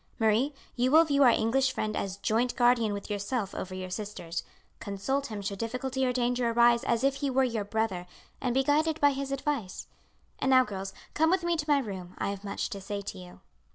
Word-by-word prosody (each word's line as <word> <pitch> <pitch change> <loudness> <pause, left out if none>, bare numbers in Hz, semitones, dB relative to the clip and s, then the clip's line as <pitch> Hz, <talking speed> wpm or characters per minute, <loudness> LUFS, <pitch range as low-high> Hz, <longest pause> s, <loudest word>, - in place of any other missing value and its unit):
Marie, 225 +5 +2 0.2
you 250 +1 +2
will 320 +4 +7
view 285 -2 +2
our 260 - +8
English 240 +4 +2
friend 215 0 -2
as 195 -1 -3
joint 230 +4 0
guardian 240 -3 +3
with 200 -1 -5
yourself 205 0 -2
over 185 0 -5
your 185 0 -6
sisters. 180 -5 -4 0.4
Consult 235 +8 -2
him 210 -3 -6
should 195 0 -4
difficulty 255 +3 -2
or - - +2
danger 245 -1 +1
arise 235 0 +4
as 235 +1 +1
if 275 0 +2
he 280 - -1
were 265 0 +3
your 230 -4 -1
brother, 200 -4 -2 0.3
and 250 -2 -1
be 270 - +3
guided 310 +3 +2
by 285 0 +5
his 275 0 -4
advice. 275 -7 -3 0.5
And 265 - 0
now, 260 -1 +7
girls, 195 -4 -5 0.2
come 320 +1 +3
with 370 0 +2
me 345 0 +1
to 305 -2 -2
my 290 - +5
room, 190 -8 -5
I - - -1
have 200 0 -7
much 200 -1 -3
to 200 - -5
say 200 +1 -4
to 90 - -7
you. 90 0 -12
235 Hz, 220 wpm, -29 LUFS, 200-270 Hz, 0.5 s, our